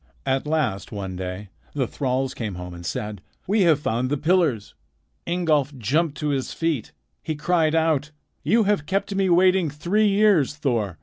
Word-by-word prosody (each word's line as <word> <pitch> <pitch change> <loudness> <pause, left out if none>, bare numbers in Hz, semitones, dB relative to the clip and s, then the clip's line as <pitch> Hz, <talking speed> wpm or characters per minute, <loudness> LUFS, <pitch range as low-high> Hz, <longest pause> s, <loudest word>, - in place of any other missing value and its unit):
At 135 +2 0
last 145 -11 -1
one 95 -3 -5
day 95 +2 -6 0.2
the 135 -3 0
thralls 130 +1 -2
came 110 -5 -4
home 90 0 -7
and 85 0 -9
said: 105 +2 -4 0.2
"We 205 +3 +2
have 155 -2 +4
found 125 -2 -1
the 145 - 0
pillars." 155 - +1 0.5
Ingolf 155 -5 +1
jumped 145 +7 0
to 150 - 0
his 135 -2 -2
feet. 165 -8 -2 0.3
He 155 - -3
cried 160 0 +1
out: 160 -3 +1 0.3
"You 220 +9 +3
have 200 -7 0
kept 195 +1 -1
me 195 -1 +1
waiting 180 -1 +4
three 175 +9 +1
years, 200 -9 +3
Thor. 115 - -1
150 Hz, 170 wpm, -23 LUFS, 115-170 Hz, 0.5 s, have